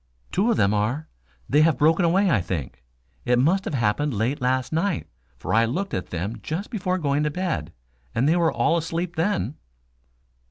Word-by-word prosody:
"Two 205 +6 +2
of 230 - +2
them 100 +1 +3
are. 115 +10 -1 0.4
They 150 - +4
have 160 -1 +4
broken 160 +4 +3
away, 185 +4 +3
I 105 -9 +3
think. 85 -9 -5 0.4
It 125 0 +2
must 175 +10 +2
have - - -2
happened 120 +4 0
late 125 +8 -1
last 130 +3 0
night, 165 0 0 0.3
for - - -4
I 115 +1 +5
looked 180 +12 -3
at 90 - -2
them 100 +7 -4
just 180 +9 -4
before 185 -5 -1
going 145 -4 0
to 150 - +1
bed, 180 +3 -3 0.4
and 125 +4 +2
they 160 - +4
were 170 -2 +3
all 170 - +2
asleep 170 +2 -3
then." 165 -3 -1
150 Hz, 190 wpm, -24 LUFS, 120-175 Hz, 0.4 s, I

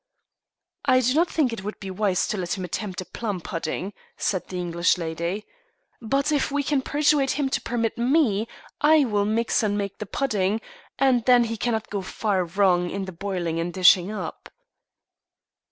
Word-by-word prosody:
"I 255 -2 +5
do 255 +1 +2
not 335 +4 +3
think 275 -7 +1
it 210 -4 -6
would 210 +1 -6
be 195 -1 -6
wise 190 -1 0
to 215 - -1
let 180 +1 -2
him 185 - -4
attempt 185 +1 -4
a - - -8
plum 205 -3 -4
pudding," 170 +3 -4 0.2
said 185 -3 -1
the 185 - -6
English 170 0 +1
lady. 170 +4 -3 0.6
"But 275 +6 0
if 290 -1 +1
we 285 0 0
can 280 -1 +1
persuade 290 0 +2
him 285 -2 0
to - - -1
permit 230 -1 -2
me 240 -5 +2 0.3
I 300 -1 +5
will 205 -4 +1
mix 225 +3 +1
and 205 -2 0
make 200 -1 -4
the 210 - -5
pudding, 210 -5 0 0.4
and 255 -3 +3
then 245 -1 +6
he 230 0 -3
cannot 225 -1 -2
go 200 -2 -2
far 190 -1 -1
wrong 180 0 +2
in 195 +1 -3
the 190 - -7
boiling 175 -2 -3
and 170 +1 -2
dishing 185 +1 +5
up." 215 - -6
210 Hz, 185 wpm, -24 LUFS, 185-250 Hz, 0.6 s, then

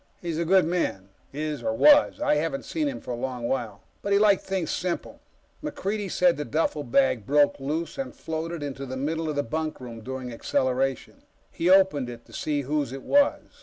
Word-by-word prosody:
He's 165 -2 -3
a 170 - 0
good 185 +1 +5
man 160 - -1 0.2
is, 150 +1 -3
or 280 0 -1
was; 290 -1 +6
I 295 - +2
haven't 150 -2 -1
seen 310 -2 -1
him 280 - -4
for - - -6
a - - -1
long 125 0 -4
while 115 -6 -3 0.2
but 200 - -3
he 200 - +5
liked 205 -2 +4
things 190 -4 -2
simple. 180 -1 -3 0.4
MacReidie 215 -9 -3
said 180 0 +3
the 150 - -2
duffelbag 140 -6 +1
broke 145 0 +3
loose 155 - -3
and 270 - -4
floated 160 0 -4
into 135 -1 -5
the 130 +1 -5
middle 160 +4 -2
of 150 - -2
the 145 - +1
bunkroom 125 -4 -4
during 130 0 -6
acceleration. 130 +2 -1 0.3
He 170 - 0
opened 185 -9 +4
it 120 -1 -10
to - - -18
see 150 -2 -1
whose 145 -1 -1
it 135 0 -7
was. 285 0 +3
155 Hz, 195 wpm, -26 LUFS, 130-185 Hz, 0.4 s, was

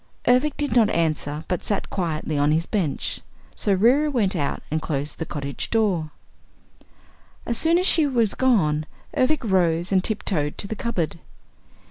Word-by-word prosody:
Ervic 255 +5 +3
did 290 -3 -1
not 225 -4 +5
answer 155 -3 -1
but 180 - -2
sat 205 - -2
quietly 160 -4 -2
on 145 +1 +2
his 160 +2 +1
bench. 180 -9 -2 0.3
So 205 - +2
Reera 255 +10 +4
went 215 -9 +1
out 145 -4 -2
and 155 +1 0
closed 145 -1 -3
the 160 - -4
cottage 140 -1 -5
door. 195 -9 +1 1.4
As 235 - -1
soon 330 +1 +3
as 365 - +1
she 320 -5 +4
was 235 -6 +1
gone, 155 -13 +2 0.3
Ervic 265 +3 +2
rose 175 -4 +1
and 190 -1 +3
tiptoed 185 -9 -1
to - - -1
the 220 - -4
cupboard. 175 -8 -2
190 Hz, 160 wpm, -23 LUFS, 155-235 Hz, 1.4 s, not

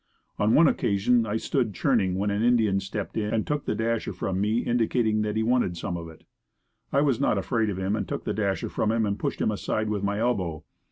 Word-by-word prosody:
On 105 +2 +3
one 165 +1 +7
occasion 110 +1 +2
I 105 +2 0
stood 115 -3 -1
churning 100 -7 +1
when 100 +2 0
an 100 +1 -1
Indian 110 -5 +3
stepped 95 +2 -5
in 105 -1 -1
and 110 - 0
took 150 -1 -2
the - - -1
dasher 115 0 -1
from 95 0 -2
me 110 +3 +1
indicating 115 -2 +1
that 105 0 -2
he 110 - +1
wanted 115 -7 +1
some 85 - -3
of 85 -1 -6
it. 80 - -15 0.7
I 140 - +3
was 140 -5 +2
not - - +2
afraid 110 +3 0
of 95 - -3
him 95 +2 -1
and 110 - -3
took - - -4
the - - -2
dasher 100 -2 -1
from 110 - 0
him 115 -1 +1
and 100 0 -2
pushed - - -2
him - - +2
aside 110 +1 -2
with 105 -2 -1
my 100 0 -1
elbow. 95 -9 -1
105 Hz, 235 wpm, -26 LUFS, 100-115 Hz, 0.7 s, one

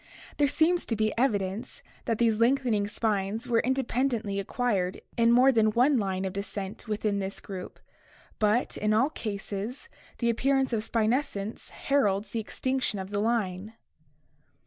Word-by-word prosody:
There 290 - +4
seems 330 +5 +2
to 230 - 0
be 215 0 0
evidence 205 -4 -1 0.2
that 230 - 0
these 225 -2 +2
lengthening 235 -4 +2
spines 210 +2 -1
were 235 -2 +3
independently 245 -5 0
ac 200 - -4
quired 200 -7 -1
in 230 0 +4
more 255 +3 +6
than 220 -3 +3
one 255 +5 +4
line 190 -2 -1
of 190 - -3
descent 200 +2 -6
within 210 -1 -1
this 195 0 -4
group, 185 -2 -8 0.6
but 215 +3 +1
in 215 0 +1
all 265 +7 +3
cases 210 +3 -5 0.3
the 235 -1 +2
appearance 270 +2 +1
of 220 - +1
spinescence 220 -1 -1
heralds 205 -7 0
the 230 - -2
extinction 260 +1 -1
of 190 +1 -6
the 205 - 0
line. 210 -2 -1
220 Hz, 150 wpm, -28 LUFS, 200-245 Hz, 0.6 s, more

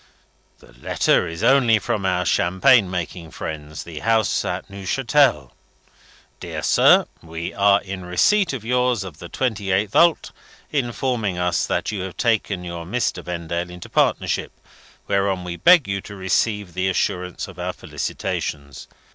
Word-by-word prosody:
"The - - -19
letter 90 - +1
is 80 0 -6
only 120 -5 +5
from 100 -1 -2
our 90 -1 0
champagne 95 +6 +3
making 85 -2 -5
friends, 75 0 -7
the 85 -3 -8
house 110 -2 +1
at - - -4
Neuchatel. 100 - +1 0.9
'Dear - - -6
Sir. - - +5 0.2
We 80 0 -6
are 100 0 +4
in 95 -1 -6
receipt 170 - +2
of 125 -5 -6
yours 125 -2 +1
of 85 -5 -10
the 85 - -9
28th 100 -5 -1
ult., 170 -1 +4 0.4
informing 120 -7 -1
us 90 -1 0
that - - -1
you 100 -3 -4
have 95 -1 -6
taken 110 -5 0
your 85 -1 -6
Mr. 95 -1 -2
Vendale 85 0 -4
into 90 0 -10
partnership, - - 0 0.6
whereon 100 -2 0
we 90 -1 -5
beg 170 - +5
you 100 0 -2
to 100 - -10
receive 100 0 -1
the 95 +2 0
assurance 90 -1 -2
of - - -12
our - - -2
felicitations. 70 -2 -5
95 Hz, 145 wpm, -22 LUFS, 90-115 Hz, 0.9 s, only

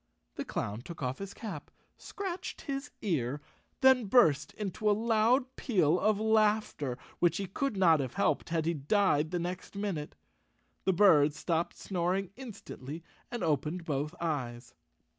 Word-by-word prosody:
The - - -5
clown 105 +3 -3
took 160 +2 -8
off 125 +1 -2
his 195 0 -6
cap, 195 -11 -7 0.3
scratched 375 -2 -6
his 275 0 -4
ear 140 - 0
and 145 - -10 0.4
then 260 -3 +6
burst 195 - +4
into 210 +1 -1
a - - +5
loud 235 +4 +2
peal 180 - +2
of 215 +1 +2
laughter, 215 - +2 0.2
which 175 0 +3
he 200 - -2
could 210 +5 -2
not 165 -5 +5
have 130 -3 -3
helped 150 - +1
had 165 -2 0
he 170 - +1
died 155 0 +2
the 175 - -1
next 180 +3 -5
minute. 195 -7 -3 0.7
The 190 - +3
bird 155 -6 +5
stopped 165 +2 -1
snoring 185 0 -1
instantly, 170 - -8 0.3
and 240 -2 -4
opened 160 +3 -1
both 150 +2 -2
eyes. 125 -7 -3
180 Hz, 155 wpm, -31 LUFS, 150-215 Hz, 0.7 s, then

